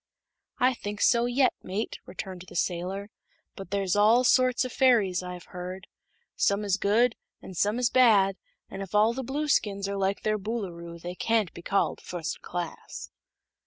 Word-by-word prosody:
"I 255 +1 +3
think 205 -3 -6
so 235 +1 +4
yet, 255 +2 +3
mate," 195 +4 -4
returned 185 0 -7
the - - -12
sailor. 185 +4 -2 0.4
"But 195 -3 -9
there's 195 -1 0
all 220 +4 +5
sorts 255 0 +3
o' - - -3
fairies, 225 -9 +3
I've 180 -1 -7
heard. 185 +2 -6 0.5
Some 200 +1 +1
is 200 -1 +1
good, 225 +4 +3 0.2
an' - - -10
some 205 +5 +1
is 245 -2 +1
bad, 210 -7 +5 0.3
an' 195 - -7
if 195 +1 -6
all 215 +2 +5
the 265 - -4
Blueskins 235 -8 0
are 200 0 -3
like 195 +1 0
their 215 0 +1
Boolooroo 180 -6 -5
they 175 +2 -6
can't 220 -1 0
be - - -9
called 195 +3 0
fust 170 -3 -5
class." 175 -2 -6
200 Hz, 165 wpm, -27 LUFS, 185-230 Hz, 0.5 s, all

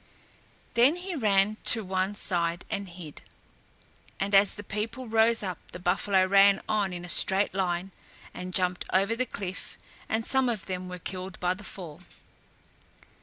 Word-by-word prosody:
Then 245 +7 +4
he 360 +1 -5
ran 210 -4 +2
to 225 -2 +5
one 190 +1 -1
side 175 -3 -1
and 200 -2 -3
hid, 170 -4 -10 1.0
and 200 +1 -2
as 195 0 +5
the 205 - -8
people 225 +5 -5
rose 225 0 +3
up 185 -4 -4
the - - -6
buffalo 185 +1 +2
ran 195 +1 +5
on 205 -3 0
in 175 0 -6
a - - -9
straight 190 +3 +4
line 185 0 -2 0.4
and 180 0 -6
jumped 180 -1 0
over 195 +4 +2
the 255 +2 -1
cliff 190 -4 -7 0.3
and 220 0 -1
some 265 -2 +2
of 220 -5 -3
them 185 -1 -5
were 180 - -6
killed 185 +1 -7
by 180 0 +1
the 200 +3 -11
fall. 175 -6 -9
195 Hz, 165 wpm, -27 LUFS, 180-215 Hz, 1.0 s, to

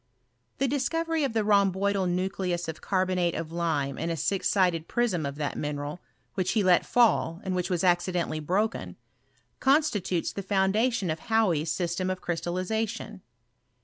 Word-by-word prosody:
The 275 - +1
discovery 325 +4 0
of 270 -5 -1
the 220 -1 +1
jiiomboidal 200 -2 +2
nucleus 180 -1 -1
of 160 - -6
carbonate 185 -3 0
of 165 -1 -4
lime 155 -5 -1
in 165 - -2
a 165 - -2
six 190 +6 0
nded 180 -5 +2
prism 200 - 0
of 140 - -5
that 145 -1 -3
mineral, 145 +2 -4 0.3
which 185 -2 0
he 215 -3 +2
let 180 -2 +4
fall, 215 -8 +3
ami 190 - -1
which 180 0 -1
was 180 -2 0
accidentally 175 -2 +1
broken, 170 - -1 0.6
constitutes 265 - +1
the 200 - -4
ibun 190 0 +1
<datkm 225 -5 +1
of 160 - -3
Hauy's 200 -9 +1
system 175 +2 -1
of 185 0 -2
crystallization. 190 +5 -3
185 Hz, 155 wpm, -27 LUFS, 170-210 Hz, 0.6 s, let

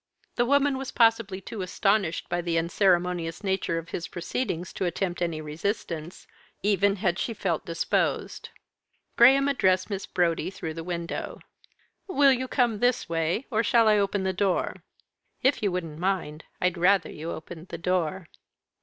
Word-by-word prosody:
The 240 - +1
woman 280 0 +3
was 270 - -5
possibly 225 -4 +2
too 210 +1 -6
astonished 190 -1 0
by 175 - -1
the 170 -1 -1
unceremonious 175 0 +1
nature 190 -3 0
of 165 0 -6
his 170 - -4
proceedings 175 0 -3
to 190 - -2
attempt 175 0 -2
any 165 -3 -1
resistance, 165 +1 -4 0.4
even 200 0 +3
had 180 -3 0
she 230 - -2
felt 175 -6 -2
disposed. 165 0 -1 0.7
Graham 270 +3 +6
addressed 185 -8 +2
Miss 195 -1 -4
Brodie 170 -1 0
through 160 -4 -6
the 165 +1 -6
window. 170 -1 -4 0.7
"Will 280 -7 +5
you 260 0 -2
come 240 -5 +1
this 245 +1 +1
way? 165 +8 -1
or 220 -1 +2
shall 230 0 +4
I 210 -1 +5
open 200 0 0
the 190 0 0
door?" 190 0 0 0.7
"If 265 +2 +3
you 205 -3 +1
wouldn't 165 -4 -4
mind, 175 -4 -2
I'd 180 -1 0
rather 190 +3 +3
you 160 +2 -6
opened 170 +1 -8
the - - -6
door." 180 0 -1
185 Hz, 160 wpm, -26 LUFS, 170-215 Hz, 0.7 s, Graham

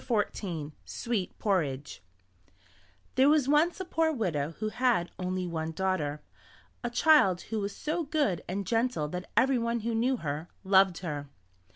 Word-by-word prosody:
SWEET 230 -6 -3
PORRIDGE 150 -9 -1 1.1
There 265 +2 +5
was 300 -3 +4
once 305 +6 +3
a 375 - -3
poor 325 -2 +1
widow 165 - -1
who 215 0 -2
had 235 -7 +1
only 185 0 -2
one 160 -2 -3
daughter, 160 -6 -1 0.6
a 240 - -1
child 240 - +4
who 220 - +1
was 200 0 -3
so 320 +2 -2
good 285 - 0
and 195 +2 -3
gentle 225 -9 0
that 180 +2 -6
everyone 235 -2 +2
who 230 +2 -2
knew 245 +3 +1
her, 155 -1 -4
loved 190 -2 +4
her. 145 -3 -4
200 Hz, 145 wpm, -29 LUFS, 175-255 Hz, 1.1 s, There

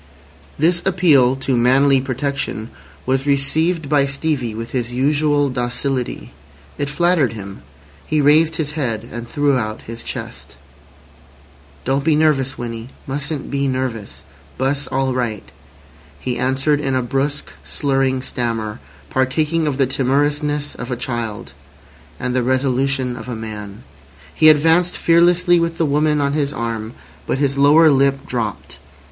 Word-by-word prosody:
This 170 +3 +2
appeal 155 -9 +4
to 135 -1 -1
manly 130 +3 +4
protection 130 -4 -3 0.3
was 135 +2 0
received 155 +4 +1
by 140 -1 +3
Stevie 135 -5 -2
with 115 +1 -6
his 120 -2 -2
usual 145 +3 +2
docility. 125 +1 -3 0.5
It 145 -1 -1
flattered 170 -4 +2
him. 100 -3 -9 0.4
He 155 - 0
raised 155 +3 +4
his 150 -2 -2
head 120 -7 -3
and 120 +1 -6
threw 145 0 +1
out 110 -1 -4
his 115 +1 -8
chest. - - -7 1.3
"Don't 135 +2 0
be 155 0 +3
nervous, 145 -4 +2
Winnie. 115 0 -6 0.2
Mustn't 145 +2 -4
be 140 0 0
nervous! 115 - -4 0.3
'Bus 140 +1 0
all 135 0 0
right," 120 -4 -3 0.7
he 125 +9 -3
answered 135 +4 +1
in 135 -2 -1
a 130 - +1
brusque, 135 +4 -2
slurring 135 -2 0
stammer 115 -5 -3 0.3
partaking 155 +5 +1
of 140 -3 -1
the 135 - +3
timorousness 145 +3 0
of 120 - -7
a 125 - -1
child 115 - -4 0.7
and 125 0 -2
the 130 - +2
resolution 130 0 0
of 125 - -8
a 120 - -3
man. 105 -2 -7 0.5
He 155 - +6
advanced 165 +4 +4
fearlessly 175 +1 +4
with 165 0 -1
the 165 - +1
woman 150 +1 +2
on 140 -1 0
his 145 -2 0
arm, 115 0 -4 0.3
but - - 0
his 140 -1 0
lower 150 +3 +6
lip 135 0 +2
dropped. 115 -5 -4
135 Hz, 140 wpm, -19 LUFS, 125-150 Hz, 1.3 s, He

